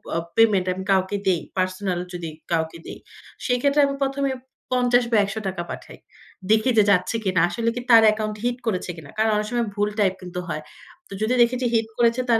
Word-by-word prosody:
অ - - +1 0.2
payment 210 -5 +4
আমি 190 +1 -6
কাউকে 190 +1 +2
দেই, 180 -3 +2 0.2
পার্সোনাল 185 0 -1
যদি 175 -2 -5 0.2
কাউকে 160 0 -1
দেই। - - -8 0.5
সেইক্ষেত্রে 280 +4 +2
আমি 275 0 -2
১ম 275 0 -1
এ - - -1 0.4
৫০ 245 -1 +3
বা 225 - +4
৳১০০ 195 -3 -4
পাঠাই। - - -9 0.5
দেখি 220 +4 +4
যে 215 - +7
যাচ্ছে 185 +3 +2
কিনা। 185 -4 +2
আসলে 230 +5 -1
কি 245 - -3
তার 225 -1 +8
অ্যাকাউন্ট 215 0 +1
হিট 245 0 0
করেছে 185 -4 -1
কিনা। 155 -3 -11
কারণ 220 0 +2
অনেক 210 0 -1
সময় 240 -2 -1
ভুল 205 0 +1
টাইপ 190 -2 +3
কিন্তু 180 0 -6
হয়। 155 -3 -4 0.5
তো - - -10
যদি 220 +3 +1
দেখেছি 245 +2 +2
হিট 225 -1 +2
করেছে 235 +1 +3
তার 230 -1 +4
215 Hz, 200 wpm, -23 LUFS, 185-240 Hz, 0.5 s, তার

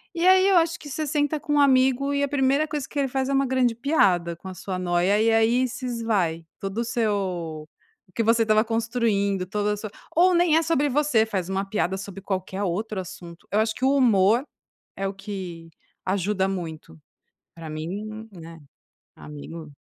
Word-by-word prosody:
E 340 +1 0
aí 375 +1 +6
eu 390 -2 +5
acho 335 +1 +2
que 300 -2 -10
você 310 +3 -3
senta 295 +1 0
com 295 - -3
um - - +4
amigo 265 0 +3
e 280 0 +1
a - - +1
primeira 275 +2 +2
coisa 295 -3 -4
que - - -9
ele 280 -1 +2
faz 265 0 -1
é - - 0
uma 275 0 +3
grande 255 -2 +1
piada 195 - +2
com 170 - -12
a 190 - -6
sua 185 0 -5
noia, 180 +3 +2
e 225 +1 +3
aí 230 +3 +3
se 255 +2 -7
esvai 210 -9 -1
todo 195 0 -5
o - - +1
seu 190 -9 -2 0.4
o - - -26
que - - +1
você 230 +1 +3
estava 215 -1 +3
construindo, 225 -4 0
toda 210 +2 -1
a - - -4
sua 210 0 -7 0.2
ou 360 +3 +5
nem 345 -2 +4
é - - +4
sobre 320 -3 +1
você, 275 -5 +2
faz 190 -5 -3
uma 195 +1 -1
piada 195 -2 -1
sobre 195 0 -8
qualquer 190 0 -3
outro 205 +3 -2
assunto, 170 -2 -10
eu 210 - +2
acho 220 0 +1
que - - -8
o 270 +2 +4
humor 225 -2 +4 0.5
é 195 - -2
o 195 - -2
que 190 -5 -7 0.4
ajuda 190 +1 0
muito. 160 - -6 0.6
Pra 165 -2 -8
mim 205 +8 -6
né, 165 -2 -11 0.6
amigo 150 +1 -9
215 Hz, 200 wpm, -24 LUFS, 185-265 Hz, 0.6 s, aí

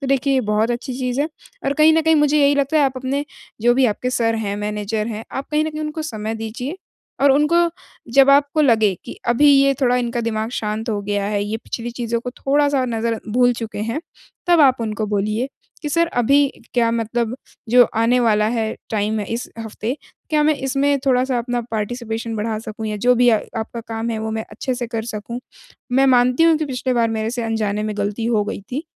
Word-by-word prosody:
तो 275 - -4
देखिए 275 0 +2
ये 260 - +3
बहुत 215 +2 +2
अच्छी 240 +2 -3
चीज़ 250 0 -1
है 300 - 0 0.4
और 275 - +1
कहीं 315 +1 +7
न 325 - +3
कहीं 320 +1 +4
मुझे 295 0 +3
यही 285 0 +4
लगता 280 +2 +1
है 290 - +4
आप 270 - +1
अपने 265 +3 -2 0.4
जो 240 +2 +4
भी 265 +1 +3
आपके 245 +3 -1
सर 230 -2 +1
हैं 205 -3 -2
मैनेजर 210 +1 -2
हैं, 225 -1 -5
आप 270 - -4
कहीं 305 0 +2
न 315 - -2
कहीं 305 0 -6
उनको 305 +1 -4
समय 220 -6 -4
दीजिए 225 +8 -5 0.5
और 280 - +6
उनको 300 +4 +3 0.6
जब 275 +1 +6
आपको 285 +2 +3
लगे 220 -7 +4
कि - - -7
अभी 240 +5 +4
ये 275 0 +5
थोड़ा 250 -2 +3
इनका 240 -1 -1
दिमाग 220 -1 -2
शांत 215 +2 -3
हो 210 -2 -1
गया 205 0 -1
है, 205 -1 -1
ये 210 +2 -2
पिछली 235 +1 -6
चीज़ों 235 -1 -2
को 250 - -5
थोड़ा-सा 280 +1 +1
नज़रअं 225 -2 -3
भूल 245 +1 +4
चुके 225 -3 -6
हैं, 230 +8 -2 0.5
तब 345 -2 +5
आप 265 -4 +5
उनको 215 -1 -2
बोलिए 210 +4 -1 0.3
कि, 300 - -2
"सर 335 +3 +2
अभी 280 +1 +3 0.3
क्या 235 -2 +3
मतलब 230 0 -1 0.3
जो 245 +2 +7
आने 230 +3 +3
वाला 215 -3 +3
है 225 -1 -1 0.2
टाइम 215 0 0
है 205 - -4
इस 235 - -4
हफ़्ते, 225 +3 -4 0.3
क्या 305 -1 +3
मैं 305 +1 +3
इसमें 275 +1 +1
थोड़ा-सा 255 -1 +2
अपना 240 +1 -2
पार्टिसिपेशन 225 +1 -3
बढ़ा 215 +1 -2
सकूँ 220 0 -6
या 215 -1 -2
जो 250 - +6
भी 245 0 +4
आ 220 - +4 0.2
आपका 230 +1 -6
काम 225 +1 -3
है 225 - -2
वो 220 0 -3
मैं 220 0 -3
अच्छे 250 +5 -3
से 245 -1 -4
कर 225 -1 -4
सकूँ? 235 +4 -5 0.5
मैं 270 +2 +4
मानती 250 +4 +3
हूँ 330 -1 +5
कि 310 - -1
पिछली 260 -2 -2
बार 235 -2 +2
मेरे 220 +1 -1
से 240 0 -3
अनजाने 215 -2 -1
में 215 -1 -3
गलती 205 +3 -2
हो 220 -3 +2
गई - - -5
थी, 290 +6 -3
240 Hz, 220 wpm, -20 LUFS, 220-270 Hz, 0.6 s, कहीं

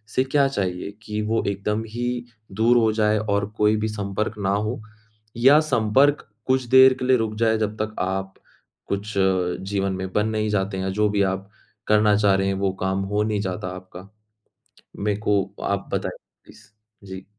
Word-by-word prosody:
से 130 - +3
क्या 140 +1 +2
चाहिए, 95 -6 -3
कि 105 0 -3
वो 110 +2 0
एकदम 105 +2 -1
ही 120 +2 -3 0.3
दूर 115 +5 +3
हो 110 -2 +3
जाए 105 -1 +2
और 100 -1 0
कोई 105 0 +3
भी 110 +1 -1
संपर्क 105 0 -3
ना 95 -1 -1
हो, 110 +3 -2 0.6
या 135 +5 +6
संपर्क 130 +4 +2 0.2
कुछ 130 0 +2
देर 130 0 +9
के 125 - -2
लिए 130 -1 +4
रुक 110 -1 -2
जाए, 110 0 +3
जब 110 -1 -2
तक 110 0 -7
आप 95 +1 -2 0.5
कुछ 100 +2 -3
जीवन 95 +1 0
में 95 0 -5
बन 105 +1 +1
नहीं 110 -1 -1
जाते 95 -1 -1
हैं, 95 0 -2
जो 105 0 +2
भी 100 0 +1
आप 95 +1 -2 0.4
करना 105 -1 +4
चाह 105 -2 +3
रहे 95 0 0
हैं, 95 - +1
वो 95 0 0
काम 95 +1 0
हो 105 +1 +2
नहीं 105 -1 -1
जाता 95 -1 -4
आपका? 95 0 -11 0.9
मैं 105 0 -1
को 105 -2 +2 0.2
आप 100 0 -2
बताइए, - - -2 0.3
प्लीज़। 105 - -17 0.4
जी। 95 0 -8
105 Hz, 185 wpm, -23 LUFS, 95-110 Hz, 0.9 s, देर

